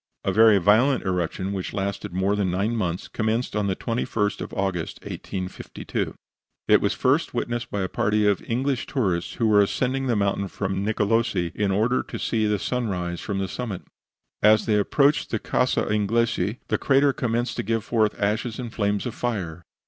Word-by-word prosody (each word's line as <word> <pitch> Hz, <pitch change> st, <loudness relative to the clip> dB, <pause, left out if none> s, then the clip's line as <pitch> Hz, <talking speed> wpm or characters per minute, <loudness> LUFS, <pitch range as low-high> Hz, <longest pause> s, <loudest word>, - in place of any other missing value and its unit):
A -, -, +1 dB
very 110 Hz, -1 st, +6 dB
violent 110 Hz, +8 st, +4 dB
eruption, 95 Hz, +1 st, -1 dB
which 95 Hz, -2 st, -4 dB
lasted 100 Hz, -2 st, -3 dB
more 95 Hz, +3 st, +1 dB
than 100 Hz, -3 st, 0 dB
nine 100 Hz, +6 st, 0 dB
months, 90 Hz, -5 st, -2 dB
commenced 110 Hz, +2 st, -1 dB
on 105 Hz, -1 st, 0 dB
the 95 Hz, -, 0 dB
21st 115 Hz, -2 st, -1 dB
of -, -, -6 dB
August, 95 Hz, -4 st, -2 dB
1852. 95 Hz, -1 st, -5 dB, 0.5 s
It -, -, +5 dB
was -, -, +1 dB
first -, -, +1 dB
witnessed 120 Hz, 0 st, -2 dB
by 100 Hz, -, -2 dB
a 95 Hz, -, 0 dB
party 105 Hz, +3 st, +1 dB
of 100 Hz, -3 st, +2 dB
English 130 Hz, +2 st, -1 dB
tourists, 95 Hz, -, -1 dB
who 115 Hz, -, -1 dB
were 105 Hz, -2 st, +5 dB
ascending 130 Hz, +6 st, 0 dB
the 120 Hz, -, +2 dB
mountain 100 Hz, -1 st, 0 dB
from 95 Hz, 0 st, -3 dB
Nicolosi 105 Hz, -4 st, +1 dB
in 105 Hz, -2 st, 0 dB
order 110 Hz, +6 st, +2 dB
to -, -, -7 dB
see 110 Hz, -2 st, 0 dB
the 105 Hz, 0 st, +1 dB
sunrise 95 Hz, -7 st, -2 dB
from 100 Hz, -2 st, -3 dB
the 95 Hz, 0 st, -1 dB
summit. 110 Hz, -3 st, -5 dB, 0.6 s
As 110 Hz, 0 st, +5 dB
they 105 Hz, -2 st, +3 dB
approached 140 Hz, +8 st, +2 dB
the 110 Hz, -, 0 dB
Casa 125 Hz, +4 st, +1 dB
Inglesi 110 Hz, +1 st, 0 dB
the -, -, +1 dB
crater 140 Hz, 0 st, +3 dB
commenced 120 Hz, -1 st, -1 dB
to -, -, 0 dB
give 115 Hz, +1 st, -1 dB
forth 110 Hz, -3 st, +1 dB
ashes 110 Hz, +3 st, -1 dB
and 120 Hz, -2 st, -6 dB
flames 100 Hz, 0 st, 0 dB
of 120 Hz, -, -3 dB
fire. 90 Hz, -9 st, -3 dB
105 Hz, 180 wpm, -24 LUFS, 95-115 Hz, 0.6 s, very